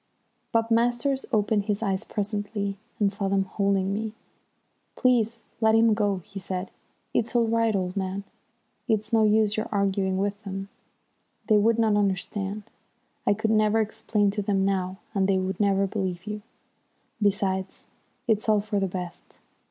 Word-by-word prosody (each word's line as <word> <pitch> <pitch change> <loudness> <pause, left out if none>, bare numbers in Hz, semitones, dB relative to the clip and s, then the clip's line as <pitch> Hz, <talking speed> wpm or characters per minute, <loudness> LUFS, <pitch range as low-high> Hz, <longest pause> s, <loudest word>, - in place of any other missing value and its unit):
Bob 230 0 +1
Masters 240 +4 +1
opened 210 -2 +2
his 210 0 -1
eyes 195 -3 0
presently, 205 -1 -3 0.2
and 200 -2 +3
saw 200 -1 -2
them 195 0 +2
holding 195 0 0
me. 215 +1 -3 0.8
"Please 230 -3 +2 0.2
let 220 0 +5
him 225 0 +5
go," 205 -4 0
he 200 -1 -8
said. 185 0 -4 0.4
"It's 230 +2 0
all 235 -1 +4
right, 225 -1 +2
old 185 -1 -1
man. 195 0 -2 0.6
It's 220 0 0
no 225 - +5
use 215 0 +3
your 215 - -2
arguing 195 -2 +1
with 200 +1 -1
them, 195 0 -5 0.8
they 215 - +5
would 225 +2 +3
not 220 -2 +3
understand. 200 +1 -1 0.6
I 205 - +5
could 220 +1 0
never 215 0 +3
explain 215 -1 +1
to 205 +1 -2
them 195 -1 +1
now, 190 -1 -1 0.2
and 195 -3 +2
they 195 -1 +3
would 190 +1 -2
never 200 -1 +3
believe 190 -3 -3
you. 210 0 -4 0.8
Besides, 190 -2 0 0.4
it's 220 -1 +1
all 215 -1 +5
for 205 0 -1
the 195 - +1
best. 180 -2 -7
205 Hz, 160 wpm, -26 LUFS, 195-220 Hz, 0.8 s, let